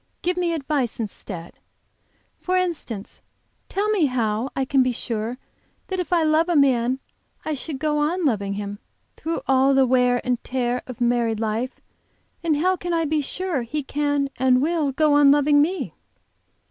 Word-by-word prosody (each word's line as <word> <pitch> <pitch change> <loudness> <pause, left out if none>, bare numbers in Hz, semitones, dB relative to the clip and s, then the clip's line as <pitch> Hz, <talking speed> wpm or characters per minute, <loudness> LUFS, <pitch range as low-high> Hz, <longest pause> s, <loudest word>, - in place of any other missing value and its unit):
"Give 360 +1 +1
me 355 -1 0
advice 280 -7 -1
instead; 190 -5 -7 0.8
for 370 0 0
instance, 310 - -3 0.5
tell 405 +2 0
me 390 -8 +3
how 230 -1 -1
I 270 - 0
can 270 0 +3
be 255 0 +2
sure 230 0 -3 0.5
that 375 -1 -2
if 360 -2 -3
I 340 -2 +3
love 315 +2 +3
a 345 - +2
man 260 -3 +3 0.5
I 310 - -1
shall 295 +1 -5
go 300 +2 0
on 330 +4 0
loving 200 -7 0
him 205 0 -5 0.4
through 330 +1 -3
all 270 +1 +4
the 270 -1 +5
wear 250 -1 +3
and 250 -1 -1
tear 250 -1 -1
of 250 -2 -9
married 235 -2 +1
life 225 +3 -2 0.6
and 320 -3 +1
how 370 +5 +2
can 350 -1 -4
I 330 -1 +1
be 305 0 +1
sure 345 0 -2
he 285 +6 -3
can 285 0 -1
and 255 -1 +4
will 305 0 +1
go 300 +2 +2
on 290 -1 +6
loving 290 0 +5
me?" 360 +6 -1
275 Hz, 170 wpm, -23 LUFS, 245-315 Hz, 0.8 s, on